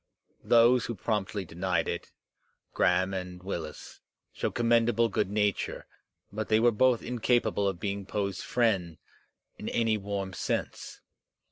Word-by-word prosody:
Those 120 +1 +5
who 120 - -3
promptly 100 -1 -2
denied 90 0 -1
it, 85 - -4 0.6
Graham 90 +2 +2
and 90 -1 -6
Willis, 85 -5 -6 0.3
showed - - -3
commendable 115 -1 +3
good 105 - 0
nature, 105 -1 -1 0.5
but 110 0 -4
they 110 0 +4
were 120 +1 +5
both 120 +2 +3
in 125 0 -4
capable 115 -4 +2
of 95 -3 -2
being 100 0 -3
Poe's 100 -3 -2
friends 95 -9 0 0.6
in - - -4
any 115 -2 +1
warm 100 -2 -4
sense. - - -4
100 Hz, 135 wpm, -29 LUFS, 95-115 Hz, 0.6 s, Those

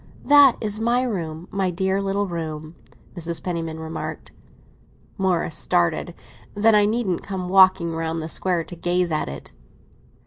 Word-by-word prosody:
"That 285 -3 +7
is 215 -1 -1
my 240 +3 +1
room—my 185 -3 -3
dear 190 +2 0
little 195 +1 -1
room!" 160 -3 -6 0.4
Mrs. 170 -2 -3
Penniman 165 -3 -4
remarked. 160 0 -6 0.8
Morris 180 -4 0
started. 85 - 0 0.4
"Then 215 +2 +4
I 210 -1 +5
needn't 210 -5 -1
come 185 -2 -5
walking 185 -3 +5
round 165 0 -2
the 160 - -4
Square 175 +1 -1
to 175 - -10
gaze 175 0 0
at 155 - -1
it." 70 - -9
180 Hz, 140 wpm, -23 LUFS, 165-200 Hz, 0.8 s, That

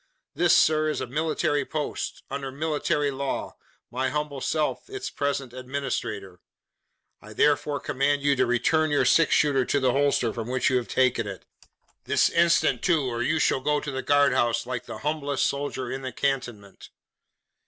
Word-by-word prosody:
This, 175 -1 +4
sir, 155 0 +3
is 150 - -2
a - - -2
military 145 +2 0
post 150 -2 -4
under 135 -1 -4
military 150 0 -1
law 135 0 -4 0.4
my 130 +2 -1
humble 150 -2 -3
self 155 - -1
its 400 -1 -5
present 140 -3 -2
administrator. 125 -8 -4 0.8
I 110 +1 -12
therefore 145 +3 +2
command 140 0 0
you 140 -1 +3
to 130 -1 +2
return 155 +6 +2
your 145 - +2
six 165 - +4
shooter 140 -3 +3
to 140 - +1
the 130 -2 +2
holster 140 -4 +1
from 115 -1 -5
which 130 +1 +1
you 130 - +3
have 125 - -3
taken 125 -4 +1
it. 95 -3 -8 0.6
This - - +2
instant 170 0 +3
too, 165 -5 +2
or 120 0 -3
you 150 +6 +1
shall 135 - +1
go 150 +2 +1
to 150 - -5
the 130 0 -3
guard 145 -2 +3
house, 120 0 +1
like 125 -1 -5
the - - -6
humblest 150 -2 0
soldier 140 -3 -3
in 135 - -4
the 130 -1 -5
cantonment!" 120 -7 -4
140 Hz, 175 wpm, -25 LUFS, 125-150 Hz, 0.8 s, This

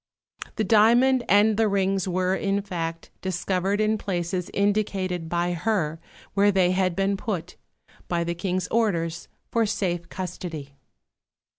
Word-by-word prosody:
The 220 - 0
diamond 235 +5 +5
and 205 +2 +5
the 225 -1 +3
rings 195 -1 +1
were, 185 0 +1
in 200 +1 0
fact, 165 -4 -5
discovered 190 +2 -1
in 215 0 +1
places 180 -2 -2
indicated 195 -4 0
by 175 +1 0
her 170 -4 -1 0.3
where 205 +1 +4
they 185 -2 +3
had 185 -1 +1
been 195 +1 +1
put, 185 -4 -4 0.5
by 170 -1 0
the 170 0 -2
King's 180 +1 -2
orders, 170 -7 0 0.2
for 230 -2 +2
safe 175 -5 -2
custody. 165 -6 -6
190 Hz, 135 wpm, -25 LUFS, 175-205 Hz, 0.5 s, diamond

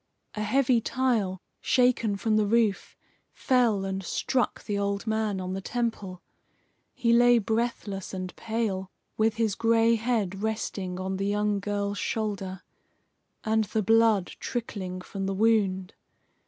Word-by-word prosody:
A 215 - -4
heavy 240 +2 +2
tile, 225 -8 0 0.2
shaken 245 -4 +2
from 215 +2 +1
the 215 -1 +3
roof, 220 -2 +1 0.4
fell 235 -7 +2
and 195 0 -3
struck 250 +6 -1
the 205 - -3
old 200 0 -1
man 220 -3 0
on 185 0 -4
the 195 - -4
temple. 205 -6 -3 0.7
He 235 -2 +2
lay 240 0 +6
breathless 220 -3 -2
and 185 -1 -5
pale, 215 -4 -2 0.3
with 220 0 +2
his 225 -3 +1
gray 230 +1 +3
head 215 -5 -1
resting 200 -4 -3
on 190 0 -3
the 195 +1 -1
young 205 0 +1
girl's 200 0 -2
shoulder, 195 -4 -3 0.8
and 220 0 +2
the 215 +2 -1
blood 225 -3 +3
trickling 190 -6 -4
from 195 +1 -5
the 195 - -1
wound. 195 -4 +2
210 Hz, 140 wpm, -27 LUFS, 195-230 Hz, 0.8 s, lay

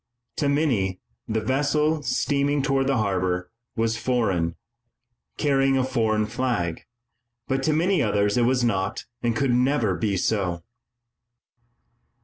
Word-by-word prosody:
To 145 - +1
many 120 - +1 0.3
the 110 0 -1
vessel, 145 +5 +1
steaming 140 +3 0
toward 135 -1 +1
the 135 -2 +2
harbor, 90 -4 -1 0.2
was 115 0 0
foreign, 95 -10 0 0.8
carrying 135 -2 +2
a 130 - +2
foreign 110 -4 +1
flag, 110 -8 -2 0.6
but 135 0 0
to 155 +3 +1
many 175 +4 +2
others 105 -3 +1
it 125 - +2
was 125 +1 +2
not 95 -4 -1 0.2
and 120 -1 0
could 135 +2 +1
never 125 -4 +2
be 95 +3 -1
so. 90 -3 -1
120 Hz, 125 wpm, -24 LUFS, 100-135 Hz, 0.8 s, the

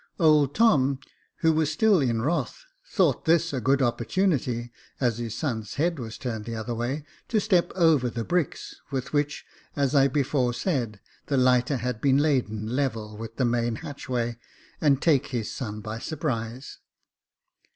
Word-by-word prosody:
Old 150 -5 +4
Tom, 140 - +4 0.4
who 160 -1 +4
was 155 -1 +1
still 205 +4 +4
in 115 -5 0
wrath, 170 - -2 0.2
thought - - +2
this 165 -1 +3
a 130 - -1
good 135 +3 +3
opportunity, 120 - 0 0.3
as 120 -3 +1
his 115 -2 -4
son's 110 - -3
head 165 +1 0
was 110 -2 -6
turned 110 -5 -4
the 115 - -4
other 115 +2 -4
way, 125 +6 -3 0.2
to 220 - +2
step 190 -4 +2
over 160 -8 +4
the 115 0 -4
bricks, 175 +3 -2
with 135 0 -4
which, 145 0 -1 0.3
as 140 -1 +1
I 140 -1 +5
before 135 -3 0
said, 120 - -1 0.3
the 140 - +1
lighter 125 +1 +3
had 125 -1 -3
been 135 -1 +4
laden 125 -8 0
level 110 -6 -2
with 115 +1 -8
the 130 - +1
main 120 -1 0
hatchway, 120 -5 -3 0.4
and 140 -3 +4
take 145 -5 +3
his 120 -5 -3
son 110 -4 -5
by 110 +2 -5
surprise. 130 -4 -4
130 Hz, 160 wpm, -26 LUFS, 115-150 Hz, 0.4 s, I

